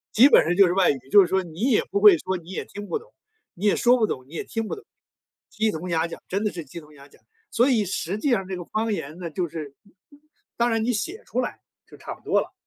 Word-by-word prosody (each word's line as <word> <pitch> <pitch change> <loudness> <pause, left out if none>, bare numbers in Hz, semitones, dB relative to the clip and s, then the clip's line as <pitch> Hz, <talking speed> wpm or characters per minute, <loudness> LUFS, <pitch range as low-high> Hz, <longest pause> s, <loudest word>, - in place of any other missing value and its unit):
基 255 +6 +8
本 - - +6
上 175 +2 +1
就 200 - +7
是 175 - +1
外 190 -1 +3
语。 135 - -4
就 205 - +8
是 180 - +2
说， 190 +1 0
你 165 0 -12
也 220 - +3
不 200 - +1
会 200 -5 +8
说 185 +2 -3
你 170 +1 -14
也 - - -4
听 205 0 -9
不 - - -1
懂 460 +3 -16 0.4
你 190 - -6
也 205 - +4
说 245 +1 +4
不 220 -3 +2
懂， 130 -8 -5
你 155 - -17
也 - - -4
听 225 -1 -3
不 - - -4
懂， 415 - -14 0.6
鸡 220 0 0
同 175 +3 -6
鸭 165 0 +1
讲 170 - -9
真 195 +3 -1
的 210 - 0
是 170 -3 -7
鸡 160 +5 -9
同 150 -1 -17
鸭 140 -1 -15
讲。 - - -23 0.3
所 245 +4 +3
以 225 -5 +3
实 190 +1 -3
际 285 - -1
上， 195 -6 +1
这 190 - -4
个 175 - -6
方 220 +3 -1
言 155 -3 -6
呢， 170 - -5
就 170 +1 -3
是 145 -4 -7 0.8
当 235 +1 +2
然 225 -1 0
你 245 - +1
写 340 - -4
出 - - -1
来， - - -5 0.3
就 - - -16
差 - - -7
不 - - -23
多 - - +2
了， - - -9
190 Hz, 305 characters per minute, -24 LUFS, 170-220 Hz, 0.8 s, 基